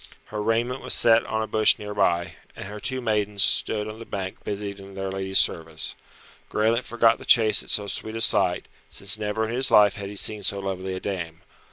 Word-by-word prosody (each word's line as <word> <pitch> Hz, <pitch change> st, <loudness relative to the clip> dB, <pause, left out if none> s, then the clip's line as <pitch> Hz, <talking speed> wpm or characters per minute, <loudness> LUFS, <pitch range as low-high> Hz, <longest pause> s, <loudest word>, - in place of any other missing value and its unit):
Her 105 Hz, -, -3 dB
raiment 120 Hz, +4 st, -1 dB
was -, -, -1 dB
set 115 Hz, 0 st, +5 dB
on 110 Hz, 0 st, -2 dB
a -, -, -5 dB
bush 110 Hz, 0 st, +4 dB
near 105 Hz, 0 st, -7 dB
by, 85 Hz, -4 st, 0 dB, 0.2 s
and -, -, -8 dB
her 105 Hz, +1 st, -8 dB
two 130 Hz, +3 st, -3 dB
maidens 105 Hz, -3 st, 0 dB
stood 105 Hz, 0 st, 0 dB
on 110 Hz, +1 st, -8 dB
the -, -, -8 dB
bank 95 Hz, -2 st, -6 dB
busied 100 Hz, -1 st, -5 dB
in 100 Hz, 0 st, -12 dB
their 95 Hz, 0 st, -4 dB
lady's 95 Hz, 0 st, -1 dB
service. 80 Hz, -1 st, +1 dB, 0.6 s
Graelent 115 Hz, +3 st, 0 dB
forgot 115 Hz, -1 st, +2 dB
the -, -, -10 dB
chase 110 Hz, -2 st, +5 dB
at -, -, -8 dB
so 105 Hz, -, +1 dB
sweet 110 Hz, +2 st, -4 dB
a 115 Hz, -, -3 dB
sight, -, -, +2 dB, 0.2 s
since 100 Hz, +2 st, 0 dB
never 110 Hz, +1 st, -2 dB
in 115 Hz, -, -5 dB
his 130 Hz, +2 st, +1 dB
life 105 Hz, -1 st, +5 dB
had 100 Hz, -2 st, -7 dB
he 105 Hz, -, -9 dB
seen 105 Hz, +1 st, +2 dB
so 100 Hz, 0 st, +1 dB
lovely 95 Hz, -1 st, -4 dB
a -, -, -5 dB
dame. 90 Hz, -5 st, -5 dB
105 Hz, 220 wpm, -24 LUFS, 95-110 Hz, 0.6 s, set